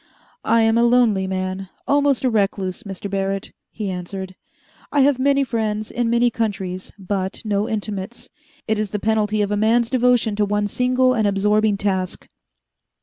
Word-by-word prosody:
"I 230 +1 +3
am 225 +1 +3
a - - +4
lonely 235 -6 +3
man, 185 0 -3 0.2
almost 285 -2 +2
a - - +4
recluse, 195 -3 -1
Mr. 200 -2 -7
Barrett," 195 0 -2 0.2
he 205 -3 -4
answered. 185 +1 -6 0.6
"I 290 - +3
have 270 -1 +3
many 275 +1 +3
friends 215 -4 -2
in 240 -1 -1
many 235 +1 +3
countries 190 -5 -3
but 190 -1 -3
no 205 0 0
intimates. 210 +1 -5 0.4
It 220 -1 0
is 215 -1 -1
the 210 - -2
penalty 215 0 +1
of 205 - -2
a 205 - +1
man's 225 +2 +2
devotion 245 -4 +2
to 210 - +2
one 205 +1 0
single 255 +4 +2
and 220 -4 +1
absorbing 210 +1 +2
task. 190 -2 -2
210 Hz, 165 wpm, -21 LUFS, 195-235 Hz, 0.6 s, a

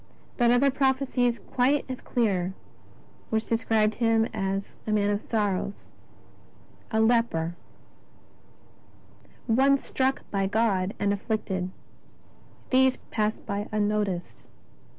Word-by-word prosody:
But 240 -2 +3
other 255 +3 +4
prophecies 260 -3 +1
quite 265 +3 +2
as 255 -1 -6
clear 190 -6 0 0.7
which 220 0 0
described 225 -1 +2
Him 225 -1 +3
as 195 0 -3
" - - -29
a - - 0
Man 205 -1 +2
of 205 0 -1
sorrows, 205 -3 -2 1.0
a 220 - 0
Leper, 220 -8 +2 1.9
One 270 +4 +4
struck 265 0 -1
by 195 -1 0
God 200 -2 +1
and 200 0 +1
afflicted," 195 -3 -2 1.0
they 260 0 +6 0.2
passed 215 0 -1
by 200 +1 -3
unnoticed. 205 -4 -1
220 Hz, 110 wpm, -27 LUFS, 200-245 Hz, 1.9 s, they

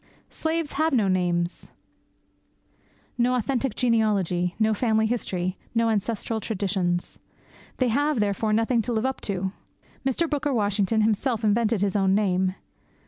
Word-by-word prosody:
Slaves 320 -1 -2
have 315 +1 +1
no 220 -6 +3
names; 175 -2 -1 1.5
no 250 +1 +3
authentic 250 0 -1
genealogy; 200 -7 +1
no 220 0 +2
family 220 0 +2
history; 185 -6 -2 0.2
no 230 0 +3
ancestral 220 +1 -1
traditions. 185 -4 -2 0.6
They 255 -2 +2
have, 290 +2 +1
therefore, 210 +1 0
nothing 225 +2 +2
to 240 +2 -3
live 220 +2 0
up 265 0 -2
to. 190 -2 -2 0.5
Mr. 270 +6 +1
Booker 290 -2 -1
Washington 205 0 +1
himself 225 +2 +1
invented 215 0 +2
his 200 -1 0
own 195 -1 +3
name. 190 -2 +1
220 Hz, 135 wpm, -25 LUFS, 195-245 Hz, 1.5 s, no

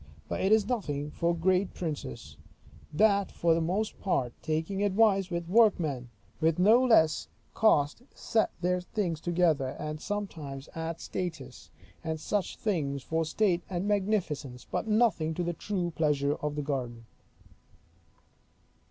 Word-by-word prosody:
But - - -3
it 190 - +2
is 220 -2 +5
nothing 150 - -2
for 170 +2 0
great 185 +3 +1
princes, 150 - -5 0.6
that 200 +4 +3
for 170 -1 +2
the 165 - +1
most 195 +7 -1
part 125 -11 0
taking 160 +5 -2
advice 200 -1 +3
with 170 -1 -3
workmen, 170 - +3 0.3
with 160 0 +2
no 220 +7 +5
less 190 -11 +4 0.3
cost 155 -5 +3
set 220 - +1
their 180 0 +1
things 180 -4 -2
together; 165 -6 +1
and 150 0 -5
sometimes 160 -10 -5
add 165 0 -4
statuas 160 -11 -6 0.3
and 160 -1 -3
such 200 +4 -2
things 140 - -1
for 160 +3 0
state 180 +1 +1
and 185 +1 -2
magnificence, 185 - -1
but - - -2
nothing 210 -8 +2
to 175 - -1
the 175 0 -1
true 180 0 -2
pleasure 145 -2 +1
of 150 0 -4
a 150 - -1
garden. 125 -5 -4
170 Hz, 140 wpm, -29 LUFS, 150-200 Hz, 0.6 s, is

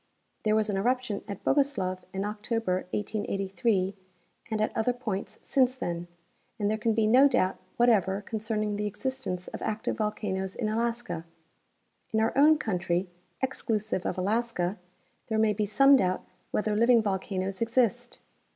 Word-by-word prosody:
There 215 0 +2
was 215 -1 +2
an 205 -2 -1
eruption 245 0 0
at 200 -3 -7
Bogoslov 245 -11 +1
in 195 +1 -2
October, 210 -3 -2
1883, 195 -1 -1 0.6
and 220 -1 -1
at 215 - 0
other 230 +2 +1
points 220 -6 -4
since 255 -2 +2
then, 175 -8 -4 0.5
and 205 -1 0
there 215 - 0
can 225 0 +1
be 220 -1 +3
no 255 +6 +7
doubt 185 -8 +1 0.2
whatever 205 -5 +3
concerning 215 -1 -2
the 210 0 -1
existence 210 -4 -4
of - - -7
active 220 0 -2
volcanoes 190 -3 -2
in 215 -3 -1
Alaska. 230 -6 -2 0.9
In 220 - +2
our 220 +1 +1
own 300 +3 +6
country, 180 - -1 0.3
exclusive 215 -7 -1
of - - -2
Alaska, 200 -1 0 0.5
there 220 - 0
may 220 -1 +3
be 210 0 -1
some 275 +7 +6
doubt 185 -5 0 0.2
whether 210 0 0
living 235 +1 +5
volcanoes 190 -1 -2
exist. 240 +1 +1
215 Hz, 150 wpm, -28 LUFS, 195-235 Hz, 0.9 s, no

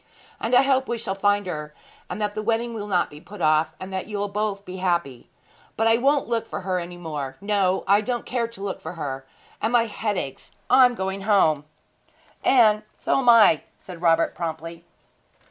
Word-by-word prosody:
'And 230 +2 +1
I 250 - +7
hope 265 -1 +2
we 240 - -1
shall 220 -4 -3
find 205 +1 +1
her, 150 -4 -6 0.3
and - - -5
that 210 -1 -1
the 215 - -3
wedding 230 +2 -1
will 210 -2 -5
not 180 -4 +1
be 150 +1 -12
put 195 +4 -12
off, 155 0 +2
and 190 +1 -8
that 190 - -3
you'll 205 -1 -3
both 205 -1 -2
be 185 +1 -7
happy. 170 -9 -2 0.5
But 225 - +1
I 225 +1 +4
won't 280 +3 +2
look 230 -1 -1
for - - -5
her 185 -1 -1
any 175 0 -7
more! 145 -6 -5
No; 195 -2 +1
I 200 +2 +5
don't 240 +1 -3
care 240 -2 -1
to 230 -4 -13
look 195 -2 -4
for - - -6
her 135 -5 -5 0.3
and 220 - 0
my 235 -1 +4
head 210 -2 -3
aches. 135 -4 -6 0.2
I 260 - +8
am 245 -1 +1
going 190 -1 -3
home!' 165 -8 +3 0.8
'And 215 -5 +5 0.2
so - - +1
am 250 -2 +3
I,' 220 -9 +7 0.2
said 175 -3 -11
Robert 165 -1 +3
promptly. 165 0 -6
200 Hz, 205 wpm, -24 LUFS, 170-225 Hz, 0.8 s, I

